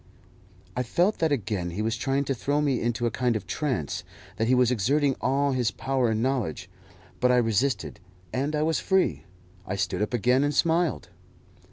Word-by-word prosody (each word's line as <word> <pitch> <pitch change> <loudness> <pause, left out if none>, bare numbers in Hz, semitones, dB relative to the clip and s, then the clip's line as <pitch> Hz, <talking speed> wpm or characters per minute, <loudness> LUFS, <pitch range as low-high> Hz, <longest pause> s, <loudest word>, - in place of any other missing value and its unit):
I 125 - 0
felt 175 - +1
that 160 -2 +1
again 105 -9 -1
he 95 +5 -3
was 115 +1 0
trying 135 +3 0
to 135 - -1
throw 145 +4 -1
me 140 -4 +1
into 120 0 -1
a 120 - +1
kind 125 0 0
of 105 - -3
trance, 125 - -2 0.3
that 110 - 0
he 130 - +4
was 125 -1 +3
exerting 135 +5 +2
all 140 +1 +1
his 125 -4 +1
power 130 -3 0
and 110 +1 0
knowledge; 125 - -1 0.5
but 125 - +3
I 125 - +4
resisted, 115 -3 0 0.3
and 140 +4 -1
I 150 - +1
was 160 +1 +1
free. 190 -1 +1 0.4
I 100 - -2
stood 95 +1 -1
up 105 - -1
again 125 +4 +3
and 145 0 0
smiled. 165 -1 +1
125 Hz, 190 wpm, -26 LUFS, 115-140 Hz, 0.5 s, he